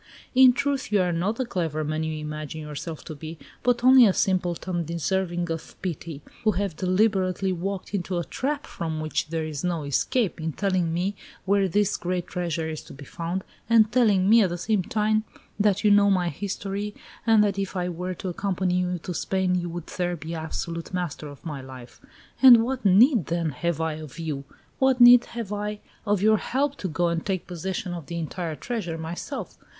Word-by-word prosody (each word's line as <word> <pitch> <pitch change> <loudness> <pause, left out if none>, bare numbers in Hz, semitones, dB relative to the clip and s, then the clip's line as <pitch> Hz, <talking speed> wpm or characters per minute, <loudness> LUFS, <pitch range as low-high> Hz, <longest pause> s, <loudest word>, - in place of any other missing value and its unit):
In 260 -1 +7
truth, 280 -2 -1
you 205 - +4
are 180 -1 +2
not 180 +6 0
the 260 - -2
clever 160 -8 -2
man 155 +1 -2
you 160 -1 -2
imagine 155 0 -5
yourself 150 +1 -7
to 160 - -6
be, 160 +2 -8 0.2
but 245 -1 +1
only 255 -2 +8
a 195 - +3
simpleton 180 -2 0
deserving 175 +1 -1
of 165 -1 -6
pity, 165 -4 -5 0.2
who 215 -1 +3
have 190 -2 -2
deliberately 190 0 +1
walked 190 +3 -4
into 185 -2 -2
a 170 - -1
trap 285 - -3
from 160 -2 -4
which 155 +1 -2
there 160 0 -2
is 150 -2 -5
no 175 -3 -1
escape, 170 - 0
in 160 -1 -2
telling 185 -3 0
me 180 +5 -1 0.3
where 195 0 +3
this 205 +3 +1
great 180 0 -2
treasure 170 -3 -2
is 155 -1 -5
to - - -11
be 140 +1 -11
found, 170 +6 -4 0.3
and 225 -2 +5
telling 210 -6 +3
me 225 +2 +7
at 195 - +3
the 175 - -3
same 210 +2 +1
time 215 +3 +1 0.4
that 205 0 +2
you 210 - +5
know 205 0 +6
my 180 -3 +2
history, 200 +4 -4 0.3
and 220 -2 +6
that 200 -1 0
if 195 0 -3
I 180 -1 -1
were 180 +1 -4
to 185 - -5
accompany 180 0 0
you 180 0 -1
to 180 - -4
Spain 190 +1 0
you 175 -1 -1
would 170 -1 -6
there 175 -1 -2
be 165 0 -7
absolute 165 +2 -4
master 170 -4 -3
of 145 +1 -12
my 150 -4 -5
life. 130 -2 -12 0.4
And 245 -4 +9
what 260 0 -3
need, 210 - +5
then, 165 -1 -1
have 170 +5 -2
I 160 -1 0
of 155 -2 -10
you? 150 -4 -4 0.3
What 265 -1 +3
need 245 0 +9
have 230 -4 -5
I 210 0 -3 0.3
of 205 -1 +1
your 215 0 +5
help 280 +6 -1
to 190 - -3
go 170 +1 0
and 170 -1 -1
take 190 -3 -2
possession 180 +1 -4
of 170 -5 -7
the 170 - -4
entire 165 0 -4
treasure 190 -6 -4
myself? 170 - -6
180 Hz, 200 wpm, -25 LUFS, 165-205 Hz, 0.4 s, And